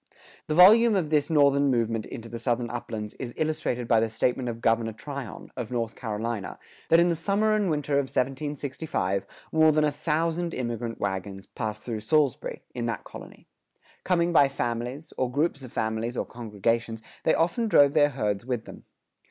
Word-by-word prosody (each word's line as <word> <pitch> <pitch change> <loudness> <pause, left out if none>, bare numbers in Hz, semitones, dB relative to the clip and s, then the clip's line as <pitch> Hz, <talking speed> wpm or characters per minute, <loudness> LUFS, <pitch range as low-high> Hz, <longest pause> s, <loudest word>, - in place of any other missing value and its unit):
The 155 - -1
volume 215 +6 +7
of 165 -5 0
this 145 -2 +2
Northern 140 -2 +4
movement 115 -3 0
into 115 -2 -8
the 115 +1 -6
Southern 120 0 -1
uplands 110 -3 -5
is 120 -2 -6
illustrated 150 -6 -1
by 115 -1 +4
the 115 0 +1
statement 125 +3 0
of 115 -1 -5
Governor 115 -1 +1
Tryon, 135 -1 -8
of 120 -4 -5
North 115 -2 -2
Carolina, 110 -2 -4 0.3
that 165 - +6
in 175 +1 +4
the 170 - +1
summer 200 +6 +1
and 210 -3 +1
winter 150 -2 -1
of 140 - 0
1765 135 - -2 0.2
more 160 0 +5
than 155 0 +2
a 150 - +2
thousand 165 +3 -1
immigrant 120 -2 -4
wagons 95 0 -4
passed 110 -2 -5
through 115 -3 -4
Salisbury, 140 +5 0
in 120 -1 -3
that 115 - -3
colony.[106:1] - - -15
Coming 175 -1 +1
by 140 -4 +6
families, 125 +3 -4
or 130 - +1
groups 145 +1 0
of 130 -3 -10
families 110 +2 -2
or - - -1
congregations, 115 0 -2 0.2
they 160 - +3
often 175 +8 +1
drove 145 -8 +5
their 145 -2 +5
herds 105 -7 -2
with 125 -2 -3
them. - - -12
125 Hz, 175 wpm, -26 LUFS, 115-155 Hz, 0.3 s, volume